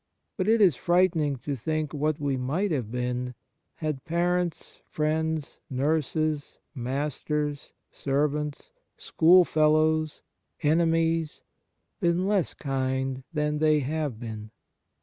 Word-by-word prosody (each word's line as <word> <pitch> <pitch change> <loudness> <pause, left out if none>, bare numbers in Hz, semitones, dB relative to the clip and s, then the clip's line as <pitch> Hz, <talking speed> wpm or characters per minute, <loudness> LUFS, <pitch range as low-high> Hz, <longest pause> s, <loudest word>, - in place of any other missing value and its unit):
But 190 -1 -1
it 225 0 +4
is 180 -9 +6
frightening 170 -3 +2
to 145 - -1
think 155 +4 -2
what 150 +1 0
we 140 -2 0
might 150 +10 -1
have 125 -8 -2
been 125 0 -2 0.4
had 155 -4 -3
parents, 175 +1 -1
friends, 155 0 -1
nurses, 150 +2 -1 0.2
masters, 145 +2 -3 0.2
servants, 150 - -1 0.3
schoolfellows, 155 -2 +3 0.4
enemies, 165 0 +1 0.6
been 175 -1 +1
less 200 -3 +1
kind 130 -1 -2
than 150 -1 -1
they 155 -1 +4
have 145 -4 -2
been. 110 -2 -7
150 Hz, 105 wpm, -27 LUFS, 140-165 Hz, 0.6 s, is